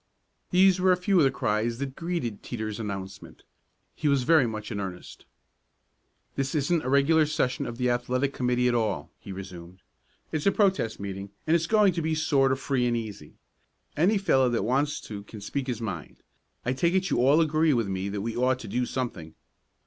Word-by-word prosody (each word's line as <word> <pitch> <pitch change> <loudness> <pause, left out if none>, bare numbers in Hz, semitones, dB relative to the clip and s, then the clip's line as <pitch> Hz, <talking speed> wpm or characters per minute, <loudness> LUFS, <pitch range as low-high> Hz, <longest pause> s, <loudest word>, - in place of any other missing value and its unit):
These 185 0 +5
were 185 0 +5
a 180 - +4
few 185 +1 +2
of - - +5
the - - +5
cries 115 -2 -1
that 135 0 -5
greeted 165 - -3
Teeter's 110 -3 -5
announcement. 95 -3 -7 0.5
He 150 - -2
was 140 -3 +3
very 155 -2 +4
much 110 0 -6
in 105 - -3
earnest. 95 -3 -7 1.1
"This 135 +2 -2
isn't 155 +3 +1
a 130 - -2
regular 150 +3 +4
session 130 -4 -1
of 115 - -6
the 125 -1 +1
athletic 125 +3 0
committee 125 0 +1
at 125 - +2
all," 115 -3 -1
he - - -9
resumed. 95 -1 -9 0.5
"It's 155 +3 -1
a - - +6
protest 190 - +1
meeting, 100 0 -6 0.2
and 160 - +3
it's 165 -1 +1
going 210 -3 +4
to 170 - -2
be 160 0 0
sort 140 -3 +2
of 135 - 0
free 130 -3 0
and 120 -1 +1
easy. 110 -3 -7 0.6
Any 190 +8 +3
fellow 135 -10 +3
that 115 -4 0
wants 140 +5 0
to 105 -2 -7
can 105 +2 -11
speak 135 +6 -4
his 120 -3 -3
mind. 90 - -6 0.4
I 125 - +1
take 170 +7 +1
it 190 -1 +1
you - - +2
all 140 +5 +5
agree 155 -2 +3
with 115 -4 0
me 95 +1 -3
that 100 0 -3
we 115 +2 -3
ought 125 +1 +2
to - - -8
do 125 0 -1
something." 95 -12 -4
125 Hz, 200 wpm, -27 LUFS, 110-155 Hz, 1.1 s, a